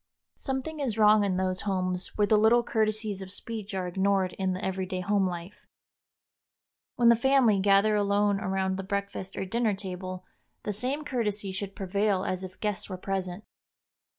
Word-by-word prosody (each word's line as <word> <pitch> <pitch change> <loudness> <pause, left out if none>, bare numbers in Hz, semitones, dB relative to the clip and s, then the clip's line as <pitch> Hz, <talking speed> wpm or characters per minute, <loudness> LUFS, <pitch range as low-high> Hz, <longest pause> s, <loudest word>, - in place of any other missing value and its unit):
Something 270 +3 -3
is 245 -6 -1
wrong 210 -1 +6
in 190 -2 0
those 185 0 0
homes 185 -2 -2
where 210 - +4
the 215 - +4
little 225 +3 +5
courtesies 215 -3 0
of 190 - -7
speech 210 0 -6
are 185 -1 -1
ignored 190 0 +1
in 190 -1 +1
the 185 - -4
everyday 185 -1 -2
home 195 0 +2
life. 175 +2 -7 1.3
When 240 -1 +5
the 235 - +7
family 240 -4 +4
gather 200 +2 +4
alone 205 0 +2
around 190 0 -1
the 195 - -4
breakfast 200 -1 -4
or 195 - -2
dinner 225 +1 0
table 185 -1 -6 0.4
the 210 - -2
same 260 +8 -2
courtesy 210 -7 -2
should 195 +1 -5
prevail 200 0 0
as 185 0 -2
if 185 0 -9
guests 210 -2 -2
were 185 - -4
present. 190 0 -3
200 Hz, 170 wpm, -28 LUFS, 190-215 Hz, 1.3 s, the